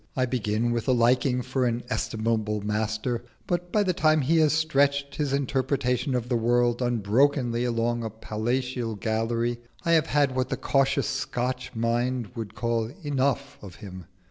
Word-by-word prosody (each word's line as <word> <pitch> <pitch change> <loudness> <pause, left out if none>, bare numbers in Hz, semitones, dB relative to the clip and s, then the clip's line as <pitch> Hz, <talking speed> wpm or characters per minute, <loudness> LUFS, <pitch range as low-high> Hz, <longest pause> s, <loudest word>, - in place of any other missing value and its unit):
I 130 - +2
begin 120 -2 0
with 120 -1 -2
a 130 - +4
liking 125 +1 +2
for 125 0 0
an 120 0 -1
estimable 110 -3 -1
master, 110 +3 -1 0.2
but 175 0 -2
by 210 - +3
the 185 -2 +1
time 155 -2 +3
he 160 +5 +2
has 155 -2 +4
stretched 140 -2 +1
his 145 -3 -1
interpretation 135 -1 0
of 120 -1 -1
the 125 - 0
world 120 +1 +2
unbrokenly 120 +2 +2
along 120 0 0
a 110 - -2
palatial 115 +2 -2
gallery, 115 +3 -1 0.3
I 170 - +2
have 160 -1 +4
had 140 -3 +2
what 130 0 0
the - - -2
cautious 135 -1 +1
Scotch 125 -2 -3
mind 120 0 0
would 110 -2 -6
call 115 0 -1
"enough" 140 -1 -1
of 95 -3 -10
him. 95 -4 -10
125 Hz, 165 wpm, -26 LUFS, 115-135 Hz, 0.3 s, a